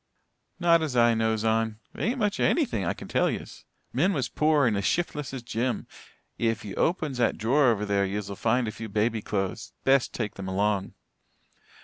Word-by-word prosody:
"Not 170 -2 +4
as 150 -5 -2
I 120 -1 +5
knows 110 -1 0
on. 110 -1 +1 0.2
There - - -5
ain't 240 +5 0
much 210 -3 0
here - - +3
of - - +4
anything, 260 - 0
I 85 - -1
kin - - -9
tell - - +2
yez. - - -7 0.3
Min 175 +10 +2
was 135 -7 -1
pore 150 -2 +3
and 110 -3 +2
as 100 - -1
shiftless 150 - -1
as 130 -3 -6
Jim. 120 +1 -2 0.5
Ef 115 -2 0
ye 100 - -6
opens 155 -7 0
that 120 - +2
drawer 130 +7 +3
over 105 -3 +2
there 100 -1 +1
yez'll 100 +1 -3
find 120 +3 +1
a - - -2
few 110 0 -7
baby 110 +2 0
clo'es. 95 -2 -3
Best 135 -1 +3
take 110 -3 -3
them 95 -1 -7
along." 100 +1 0
115 Hz, 205 wpm, -27 LUFS, 105-145 Hz, 0.5 s, I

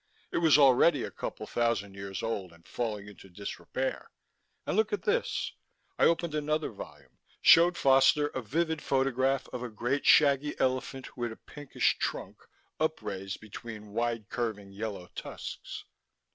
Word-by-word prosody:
"It - - 0
was 160 -3 +6
already 140 0 +5
a - - -5
couple - - -6
thousand 115 -4 0
years 100 +1 -6
old, 100 -6 -3
and 85 0 -20
falling 105 -4 -3
into 100 -1 -13
disrepair. 100 +3 -4 0.6
And - - -1
look 220 +1 +2
at 205 - -2
this 475 +3 0 0.2
" - - -38
I - - +6
opened 170 -1 +2
another 155 -1 -1
volume, 105 - -12 0.2
showed 175 +1 +7
Foster 135 +2 +5
a 130 - -4
vivid 160 +6 -1
photograph 135 0 +1
of 125 - -6
a 125 - -4
great 120 +6 -1
shaggy 145 -1 +5
elephant 130 0 -1
with 120 -2 -3
a - - -8
pinkish 145 -2 -1
trunk - - -3 0.4
upraised 100 -12 -3
between 105 0 -9
wide 115 -2 -1
curving 110 -5 -3
yellow 100 -2 -5
tusks. - - -7
125 Hz, 150 wpm, -30 LUFS, 105-150 Hz, 0.6 s, showed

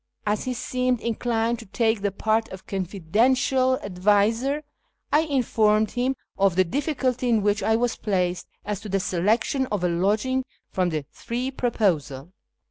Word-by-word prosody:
As 210 0 0
he 255 -1 -2
seemed 250 +1 0
inclined 230 0 -1
to - - -11
take 220 0 +1
the 200 0 0
part 220 +3 0
of 190 0 -10
confidential 230 +8 +1
adviser, 210 +9 +1 0.5
I 300 - +6
informed 220 -6 +2
liim 255 +2 -1 0.2
of 195 -3 +3
the 185 - +5
difficulty 255 - -1
in 225 -3 +3
which 205 0 +2
I 220 - +2
was 240 0 0
placed 180 -3 -1 0.2
as 210 -2 -2
to 205 +1 -8
the 195 +1 +1
selection 210 +9 +1
of 205 -6 -2
a - - +3
lodging 210 +9 +1 0.3
from 185 -1 +1
the 155 -3 -3
three 250 +3 -4
proposed. 205 - 0
220 Hz, 155 wpm, -24 LUFS, 195-250 Hz, 0.5 s, I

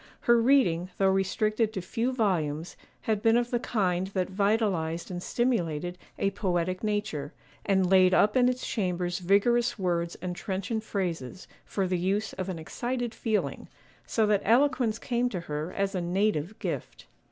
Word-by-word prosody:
Her 235 -1 +4
reading, 190 -10 +3
though 195 -1 +3
restricted 215 +3 +1
to 190 - -3
few 230 +7 -1
volumes, 175 - -1 0.3
had 215 -2 -1
been 225 +1 +4
of 240 0 0
the 240 - +1
kind 190 -6 0
that 190 -1 -2
vitalized 190 -5 0
and 175 -1 -4
stimulated 175 -9 -1 0.2
a 195 - +1
poetic 185 -2 -1
nature, 205 -8 -2 0.3
and 190 -2 +3
laid 185 0 +5
up 205 +3 +4
in 250 -1 +5
its 255 0 -3
chambers 180 -3 -1
vigorous 235 +7 +2
words 170 -3 -1
and 180 0 -5
trenchant 200 +4 -3
phrases, 180 - -4 0.2
for 195 - -1
the 180 -1 0
use 195 +4 0
of 185 0 -4
an 180 - -3
excited 240 +8 -3
feeling—so 220 0 -2
that 210 -2 +2
eloquence 240 -1 +3
came 245 +1 0
to 185 -7 -4
her 150 +1 -4
as 195 0 -1
a 185 - -1
native 185 0 0
gift. - - -5
195 Hz, 160 wpm, -28 LUFS, 180-225 Hz, 0.3 s, laid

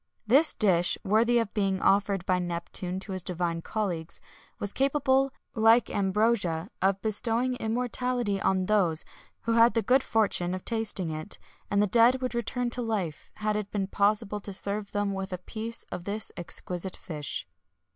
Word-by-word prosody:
This 275 +8 +4
dish, 180 -5 +3
worthy 225 +4 +3
of 230 -3 0
being 195 -3 0
offered 195 -2 +2
by 185 -1 +2
Neptune 175 +1 -3
to 195 - -7
his 185 -1 -3
divine 175 -1 -2
colleagues, 175 -6 -3 0.4
was 205 - -4
capable, 270 -1 +2 0.2
like 225 +2 +4
ambrosia, 195 -2 +1
of 195 +1 +2
bestowing 230 +3 0
immortality 245 -2 -1
on 190 -1 +1
those 185 -6 +2 0.4
who 230 - 0
had 230 +1 +5
the 230 - +2
good 260 +2 +4
fortune 200 -7 +1
of 185 - -8
tasting 215 -7 -1
it, 155 +6 -3 0.3
and 205 0 +3
the - - +4
dead 235 +5 +5
would 255 -1 -3
return 240 +1 -2
to 250 - -3
life, 200 -10 -3
had 215 0 -1
it 210 -1 -3
been 200 -2 -1
possible 205 +1 +1
to 200 -1 -6
serve 200 +1 -1
them 205 -1 -1
with 195 0 -4
a 180 - -2
piece 220 +5 -5
of 175 - -6
this 210 +1 -3
exquisite 180 +1 -3
fish. 150 -4 -4
205 Hz, 165 wpm, -28 LUFS, 185-230 Hz, 0.4 s, had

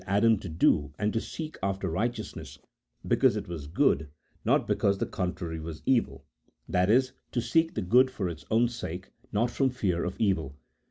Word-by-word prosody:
Adam 105 +4 +4
to 95 - -7
do 75 -3 +2
and 105 0 0
to 115 - 0
seek 155 +3 -7
after 95 0 -1
righteousness 110 +6 -3 0.5
because - - +4
it - - -5
was 80 -5 -6
good, 80 - +2 0.3
not - - +3
because 100 0 +2
the - - -1
contrary 90 -3 -3
was 80 -1 -7
evil: 70 - +1 0.4
that 90 +2 +2
is, 130 +3 +4 0.2
to 120 - 0
seek 165 +7 +1
the - - -1
good 125 +8 +5
for 100 -7 -3
its 80 -3 -6
own 115 +2 +4
sake, 95 -6 -6 0.2
not 115 +3 +1
from 135 -1 +2
fear 100 -9 -1
of 90 - -3
evil. 80 -10 0
100 Hz, 180 wpm, -28 LUFS, 85-120 Hz, 0.5 s, good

